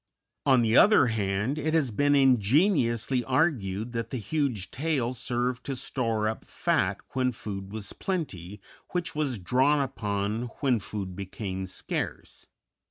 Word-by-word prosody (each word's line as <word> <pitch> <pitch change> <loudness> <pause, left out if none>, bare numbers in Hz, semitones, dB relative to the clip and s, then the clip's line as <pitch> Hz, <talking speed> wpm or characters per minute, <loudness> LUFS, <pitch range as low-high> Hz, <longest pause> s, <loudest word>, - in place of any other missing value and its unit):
On 130 -3 +5
the 115 0 +2
other 210 -6 +7
hand, 105 +7 -1
it 155 +2 0
has 140 -7 +2
been 145 +6 +3
ingeniously 125 - +3
argued 115 - 0
that 115 -1 -3
the 130 - -3
huge 120 -3 -2
tail 135 -5 -1
served 125 0 -2
to 135 - -2
store 115 -4 -1
up 110 - -3
fat - - 0 0.2
when 130 -1 +1
food 100 -4 -6
was 105 -2 -5
plenty, 105 - -4 0.3
which 175 -2 -1
was 145 -5 -1
drawn 130 +10 +2
upon 105 -4 -2
when 130 -5 +2
food 95 -2 -5
became 95 0 -5
scarce. 95 - -4
120 Hz, 140 wpm, -27 LUFS, 105-140 Hz, 0.3 s, other